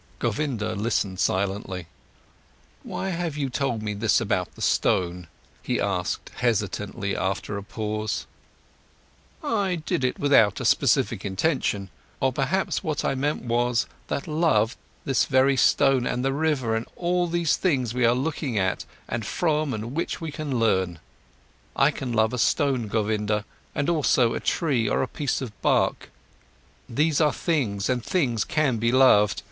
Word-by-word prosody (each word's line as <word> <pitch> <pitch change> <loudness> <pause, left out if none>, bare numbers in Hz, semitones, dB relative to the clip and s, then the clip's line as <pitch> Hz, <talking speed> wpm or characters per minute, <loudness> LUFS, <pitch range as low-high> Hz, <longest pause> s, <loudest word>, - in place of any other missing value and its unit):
Govinda 120 -8 -1
listened 100 -3 -1
silently. 95 -2 -1 1.0
"Why 195 - -4
have 170 -4 -3
you 140 -3 -2
told 125 -4 -1
me 105 -1 -2
this 105 +1 +2
about - - -1
the - - -12
stone?" 90 -1 +1 0.3
he - - -1
asked 90 0 -2
hesitantly 105 -4 -1
after 95 +2 -2
a 100 - -4
pause. 105 +1 -3 1.2
"I 200 -5 0
did 155 -5 -2
it 130 - 0
without 115 -8 +4
any - - -4
specific - - +2
intention. 100 - -1 0.3
Or 130 -1 +1
perhaps 145 +9 0
what 155 -2 -2
I - - +1
meant 145 +3 -1
was, 120 0 +1 0.2
that 140 - -3
I - - -5
love 140 -8 +2 0.3
this 135 -4 +2
very 135 +1 +3
stone, 135 -1 +3
and 125 +1 -1
the 135 - +1
river, 140 -6 0
and 110 - -3
all 175 0 0
these 170 -1 +1
things 130 - 0
we 125 0 0
are 120 +1 +4
looking 135 -3 -2
at 95 -1 0 0.2
and 115 - -3
from 155 - 0 0.2
which 165 - -2
we 165 -3 -5
can 145 -4 -3
learn. 95 -6 +1 0.8
I 135 +2 +4
can 135 -3 -5
love 110 0 +2
a 125 - -2
stone, 125 +2 +1
Govinda, 105 0 0 0.3
and 140 - 0
also 135 -8 +3
a - - -2
tree 130 - 0
or - - +1
a - - -2
piece 140 -1 -2
of 115 -6 -7
bark. - - +1 0.8
These 150 +5 +2
are 150 -1 +4
things, 120 - -1
and 125 -2 0
things 120 - +1
can 150 -6 +1
be 115 +2 +1
loved. 125 -6 +5
125 Hz, 155 wpm, -25 LUFS, 105-150 Hz, 1.2 s, loved